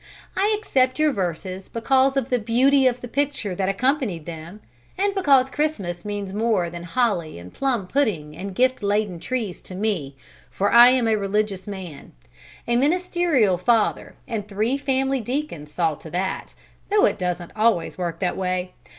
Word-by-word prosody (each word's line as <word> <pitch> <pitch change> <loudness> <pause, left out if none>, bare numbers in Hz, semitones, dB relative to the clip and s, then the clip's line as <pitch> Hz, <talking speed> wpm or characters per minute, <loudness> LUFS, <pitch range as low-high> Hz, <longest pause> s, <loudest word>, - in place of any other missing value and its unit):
I 415 +3 +2
accept 260 -11 +1
your 305 -1 +3
verses 185 0 -4
because 265 +3 +2
of 265 -1 -1
the 250 - +2
beauty 260 +5 +3
of 245 -1 0
the 245 - -6
picture 270 -5 -1
that 190 +1 -1
accompanied 230 - 0
them, 170 +4 -8 0.4
and 400 +1 +1
because 275 -9 +3
Christmas 200 - -2
means 205 -2 -4
more 210 -5 +1
than 170 0 -7
holly 175 - -1
and 85 +1 -11
plum 250 -8 0
pudding 180 - -1
and 195 +2 -6
gift 255 +2 +2
laden 205 -3 0
trees 225 -4 -3
to 185 - -10
me, 185 -9 -2 0.3
for 200 +1 0
I 240 +1 +10
am 255 -2 +2
a 220 - +3
religious 200 -1 -1
man, 185 -7 -8 0.5
a 235 0 +2
ministerial 300 - +2
father 225 +3 +1
and 215 -4 -4
three 215 +5 0
family 270 -1 0
deacons 240 - -4
saw 165 -1 +1
to 160 - -11
that, 185 +4 -3 0.3
though 420 +3 +4
it - - 0
doesn't 180 -1 -3
always 215 -6 +1
work 175 -2 -2
that 180 - 0
way! 185 -1 -2
215 Hz, 170 wpm, -23 LUFS, 180-265 Hz, 0.5 s, I